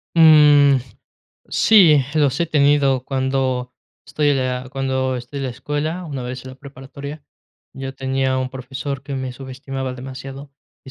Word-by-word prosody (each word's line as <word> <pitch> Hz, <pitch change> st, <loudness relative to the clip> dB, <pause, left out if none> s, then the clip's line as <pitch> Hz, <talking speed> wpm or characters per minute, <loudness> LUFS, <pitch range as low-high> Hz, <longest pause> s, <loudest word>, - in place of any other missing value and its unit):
Mm, 150 Hz, -3 st, +7 dB, 0.7 s
sí, 170 Hz, -10 st, +5 dB
los 145 Hz, -2 st, +1 dB
he 170 Hz, -, +2 dB
tenido 140 Hz, -4 st, +2 dB
cuando 130 Hz, -2 st, -1 dB, 0.3 s
estoy 150 Hz, -1 st, 0 dB
en 140 Hz, -, +1 dB
la 130 Hz, 0 st, -2 dB
cuando 130 Hz, -1 st, -1 dB
estoy 125 Hz, +4 st, -7 dB
en 135 Hz, -, -3 dB
la 130 Hz, -, -2 dB
escuela, 150 Hz, +7 st, -4 dB
una 140 Hz, -6 st, -5 dB
vez 125 Hz, 0 st, -6 dB
en 130 Hz, -, -8 dB
la -, -, -11 dB
preparatoria. 140 Hz, +2 st, -10 dB, 0.5 s
Yo 135 Hz, 0 st, -6 dB
tenía 130 Hz, 0 st, -1 dB
un 130 Hz, 0 st, -3 dB
profesor 135 Hz, +1 st, -6 dB
que 140 Hz, 0 st, -5 dB
me 130 Hz, -1 st, -3 dB
subestimaba 130 Hz, 0 st, -6 dB
demasiado, 135 Hz, +2 st, -9 dB, 0.3 s
y 130 Hz, -, -11 dB
135 Hz, 155 wpm, -20 LUFS, 130-145 Hz, 0.7 s, Mm